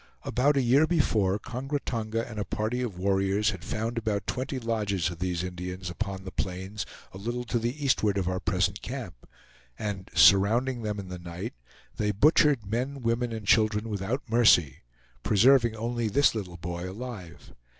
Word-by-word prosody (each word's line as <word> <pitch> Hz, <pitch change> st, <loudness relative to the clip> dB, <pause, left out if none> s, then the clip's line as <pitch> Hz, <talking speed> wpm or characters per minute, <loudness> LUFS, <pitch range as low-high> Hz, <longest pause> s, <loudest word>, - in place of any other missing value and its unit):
About 140 Hz, +3 st, +2 dB
a 135 Hz, -, +3 dB
year 135 Hz, +6 st, +4 dB
before, 110 Hz, -, +2 dB
Kongra 130 Hz, +6 st, -4 dB
Tonga 115 Hz, -3 st, -3 dB
and 110 Hz, -2 st, -7 dB
a -, -, 0 dB
party 110 Hz, +5 st, -2 dB
of 110 Hz, -8 st, -4 dB
warriors 95 Hz, +2 st, +1 dB
had 95 Hz, -4 st, -8 dB
found 115 Hz, +2 st, -2 dB
about 105 Hz, -3 st, -2 dB
twenty 130 Hz, +1 st, -3 dB
lodges 105 Hz, -8 st, -1 dB
of 85 Hz, -, -9 dB
these 90 Hz, -1 st, -1 dB
Indians 90 Hz, 0 st, -5 dB
upon 95 Hz, 0 st, -4 dB
the 95 Hz, -, -7 dB
plains 95 Hz, +3 st, -4 dB, 0.2 s
a 95 Hz, -, -10 dB
little 120 Hz, +4 st, -3 dB
to 120 Hz, 0 st, -1 dB
the 125 Hz, +6 st, -3 dB
eastward 105 Hz, -6 st, +2 dB
of 95 Hz, -3 st, -1 dB
our 95 Hz, 0 st, -1 dB
present -, -, 0 dB
camp; -, -, -7 dB, 0.5 s
and 100 Hz, -2 st, -4 dB
surrounding 115 Hz, +6 st, +5 dB
them 105 Hz, -1 st, -3 dB
in 95 Hz, -2 st, -7 dB
the 90 Hz, -1 st, -6 dB
night, 85 Hz, 0 st, -6 dB, 0.4 s
they 105 Hz, -, 0 dB
butchered 145 Hz, +1 st, +4 dB
men, 125 Hz, +6 st, -3 dB
women, 115 Hz, +1 st, 0 dB
and 110 Hz, -2 st, -5 dB
children 110 Hz, +1 st, +3 dB
without 110 Hz, +7 st, -3 dB
mercy, 110 Hz, -, +4 dB, 0.4 s
preserving 120 Hz, -, +4 dB
only 115 Hz, +1 st, -2 dB
this 140 Hz, +7 st, +3 dB
little 95 Hz, -6 st, -5 dB
boy 85 Hz, +1 st, -5 dB
alive. 100 Hz, -5 st, -9 dB
110 Hz, 170 wpm, -28 LUFS, 95-120 Hz, 0.5 s, surrounding